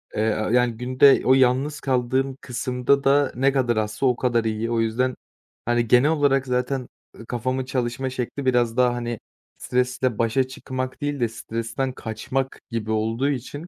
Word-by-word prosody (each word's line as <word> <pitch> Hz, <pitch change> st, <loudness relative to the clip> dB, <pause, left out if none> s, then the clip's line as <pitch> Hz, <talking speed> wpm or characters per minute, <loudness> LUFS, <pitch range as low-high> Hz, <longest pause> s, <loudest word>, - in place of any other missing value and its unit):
Eee, 110 Hz, 0 st, +1 dB
aaa, 110 Hz, 0 st, -2 dB
yani, 125 Hz, -1 st, +3 dB
günde 130 Hz, +3 st, +4 dB
o 130 Hz, -, +6 dB
yalnız 130 Hz, +3 st, +2 dB
kaldığım 130 Hz, 0 st, 0 dB
kısımda 125 Hz, +2 st, 0 dB
da 140 Hz, 0 st, +3 dB
ne 135 Hz, +3 st, +3 dB
kadar 125 Hz, -4 st, +1 dB
azsa 110 Hz, +5 st, -1 dB
o 125 Hz, -, +3 dB
kadar 120 Hz, -2 st, +1 dB
iyi. 110 Hz, +1 st, -2 dB
O 115 Hz, -, +1 dB
yüzden, 120 Hz, +3 st, 0 dB, 0.5 s
hani, 120 Hz, -1 st, +1 dB
genel 125 Hz, +6 st, +5 dB
olarak 140 Hz, -3 st, +2 dB
zaten, 125 Hz, 0 st, -1 dB, 0.3 s
ııı, 115 Hz, -, -12 dB
kafamın 130 Hz, +3 st, -2 dB
çalışma 130 Hz, 0 st, -2 dB
şekli 130 Hz, +2 st, -4 dB
biraz 120 Hz, -2 st, +2 dB
daha, 125 Hz, -1 st, +4 dB
hani, 120 Hz, -2 st, -4 dB, 0.4 s
stresle 125 Hz, -1 st, -1 dB
başa 115 Hz, +3 st, +1 dB
çıkmak 130 Hz, 0 st, -6 dB
değil 145 Hz, -1 st, -2 dB
de 120 Hz, -, +2 dB
stresten 115 Hz, +3 st, -4 dB
kaçmak 130 Hz, +4 st, -4 dB
gibi 110 Hz, -2 st, -3 dB
olduğu 115 Hz, +5 st, 0 dB
için 145 Hz, +5 st, -5 dB
125 Hz, 165 wpm, -23 LUFS, 115-135 Hz, 0.5 s, o